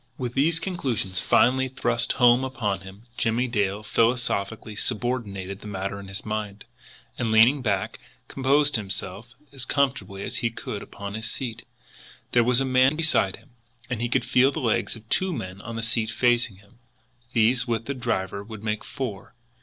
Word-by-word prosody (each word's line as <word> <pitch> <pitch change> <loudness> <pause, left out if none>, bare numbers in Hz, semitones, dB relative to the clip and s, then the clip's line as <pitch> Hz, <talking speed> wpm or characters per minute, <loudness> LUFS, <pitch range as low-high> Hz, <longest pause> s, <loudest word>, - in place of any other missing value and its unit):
With 125 -2 -3
these 155 +5 +2
conclusions 125 - -1
finally 130 +1 +4
thrust 120 -2 0
home 125 +1 +5
upon 115 -7 -1
him, 95 +3 -12 0.2
Jimmie 120 +2 +1
Dale 105 -3 0
philosophically 115 -2 0
subordinated 105 -5 -2
the - - -10
matter 100 0 -3
in 100 - -9
his 95 +1 -6
mind, 105 -1 -4 0.5
and, 115 -3 0
leaning 120 +6 +6
back, 100 -6 -1 0.3
composed 140 +1 +2
himself 100 +3 -5 0.2
as 135 -2 -6
comfortably 110 -10 0
as - - -3
he 120 - +1
could 110 -2 -6
upon 100 0 -7
his 110 +1 -3
seat. 120 -5 -5 0.6
There 120 - +5
was 125 +1 +4
a 135 - +1
man 130 +2 +4
beside 155 - +2
him, 140 - -21 0.4
and 120 -2 -1
he 120 - 0
could 125 0 +1
feel 130 +2 +4
the - - -4
legs 115 -1 +1
of 115 0 -14
two 185 +9 +1
men 95 - -5
on 115 +1 -7
the 115 - -3
seat 115 -1 +1
facing 120 -2 +2
him. 100 +5 -22 0.5
These, 120 +3 +3
with 115 -1 -1
the 140 - -2
driver, 100 -6 -2
would 110 0 -9
make 105 -1 -2
four. 115 -5 -6
115 Hz, 175 wpm, -25 LUFS, 100-130 Hz, 0.6 s, leaning